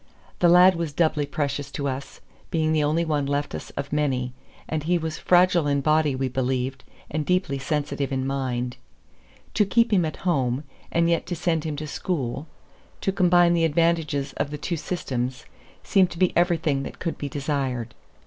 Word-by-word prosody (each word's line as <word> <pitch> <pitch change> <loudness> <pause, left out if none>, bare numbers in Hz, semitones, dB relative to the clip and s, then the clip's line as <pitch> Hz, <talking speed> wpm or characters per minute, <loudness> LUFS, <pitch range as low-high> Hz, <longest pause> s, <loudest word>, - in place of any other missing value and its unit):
The 175 - +5
lad 180 +1 +7
was 165 -3 -3
doubly 150 -2 +1
precious 145 -1 -2
to 140 - -2
us, 135 +1 -5 0.3
being 160 -1 +1
the 155 -1 +2
only 160 +3 +1
one 150 -3 0
left 145 +1 -1
us - - -6
of 140 +1 -4
many; 130 -4 0 0.3
and 155 -1 -2
he 175 +4 +1
was 160 -1 -4
fragile 180 -3 +4
in 140 -1 +1
body, 155 -1 +2
we 130 0 -1
believed, 130 +1 -2 0.3
and 155 0 -1
deeply 180 -5 0
sensitive 145 -1 -2
in 130 -1 -1
mind. 125 -2 -2 0.8
To 210 - +4
keep 230 +3 +2
him 185 -3 +4
at 155 - -3
home, 135 -6 +1 0.3
and 170 0 +2
yet 170 -1 +1
to 175 - -2
send 165 -1 0
him 155 -2 -2
to 150 +2 -5
school, 145 -3 -3 0.5
to 195 - +1
combine 175 -2 +4
the 170 -1 +2
advantages 160 -3 +1
of 140 - -1
the 150 - -5
two 170 +4 -3
systems, 130 -6 -3 0.4
seemed 190 -3 +3
to - - -9
be 185 0 +2
everything 165 -5 +2
that - - -7
could 170 - -4
be 145 - -3
desired. 135 -5 -2
150 Hz, 185 wpm, -25 LUFS, 135-170 Hz, 0.8 s, lad